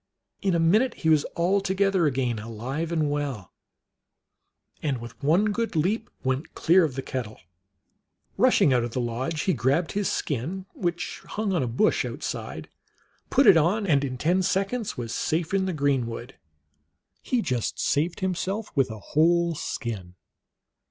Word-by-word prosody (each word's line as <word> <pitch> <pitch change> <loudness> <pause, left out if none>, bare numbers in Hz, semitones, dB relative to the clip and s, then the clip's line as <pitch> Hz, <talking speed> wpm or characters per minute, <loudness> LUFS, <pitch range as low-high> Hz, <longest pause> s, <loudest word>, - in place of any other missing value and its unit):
In 190 -3 +1
a - - +2
minute 215 +10 +3
he 160 - -1
was 155 -2 +4
all 185 +4 +2
together 195 -3 +2
again, 125 -5 0
alive 125 +9 -4
and 155 -3 +1
well, 140 -10 -3 1.3
and 140 -4 -1
with 115 0 -10
one 180 +9 +3
good 230 -2 -2
leap 200 +9 0
went 130 +3 -2
clear 180 +3 +4
of 145 -6 -1
the 135 - -3
kettle. 120 -6 -5 1.0
Rushing 135 - +4
out 120 -2 +2
of 120 -1 -4
the - - -1
lodge, 125 +6 -2
he 185 - +1
grabbed 140 +6 +1
his 205 -2 0
skin, 160 +8 -3
which 175 -1 -3
hung 210 -2 -2
on 175 - +1
a 125 - 0
bush 125 - +2
outside, - - -5 0.6
put 275 +2 +4
it 165 - +8
on, 185 +7 +2
and 145 -6 +3
in 130 -2 -3
ten 175 +8 +2
seconds 195 +5 -1
was 115 -2 -4
safe 160 +7 -1
in 190 -1 +2
the - - 0
greenwood. 135 -5 -1 0.9
He 245 -3 0
just 125 -4 -2
saved 165 +6 0
himself 190 +3 -2
with 135 -3 +2
a 110 - -6
whole 170 - +2
skin. 110 - -5
155 Hz, 160 wpm, -26 LUFS, 130-190 Hz, 1.3 s, it